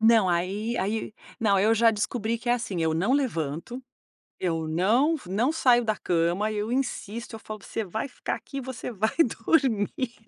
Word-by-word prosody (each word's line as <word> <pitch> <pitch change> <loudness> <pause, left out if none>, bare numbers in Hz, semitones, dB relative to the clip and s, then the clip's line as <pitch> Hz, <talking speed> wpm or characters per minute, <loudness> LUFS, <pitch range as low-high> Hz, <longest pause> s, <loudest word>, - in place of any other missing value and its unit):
Não 220 -3 +5
aí 195 +7 -1
aí 215 +3 -2 0.3
não, 205 -3 +3
eu 215 +4 +4
já 230 +1 +5
descobri 225 +1 -1
que 240 +1 -6
é - - +5
assim: 210 -8 -2
eu 160 -1 +1
não 190 +10 +1
levanto, 230 - -1 0.6
eu 165 -3 -1
não 220 - +3
não 220 +10 +1
saio 250 -6 +4
da 215 -1 +1
cama, 175 +4 0
eu 210 +1 -2
insisto, 235 -3 -3
eu - - -8
falo: 215 -1 -8
"Você 225 - -3
vai 220 +7 -3
ficar 255 - -4
aqui! 275 - -7
Você 255 -1 -6
vai 220 0 -1
dormir!" 235 -2 0
220 Hz, 175 wpm, -26 LUFS, 190-240 Hz, 0.6 s, Não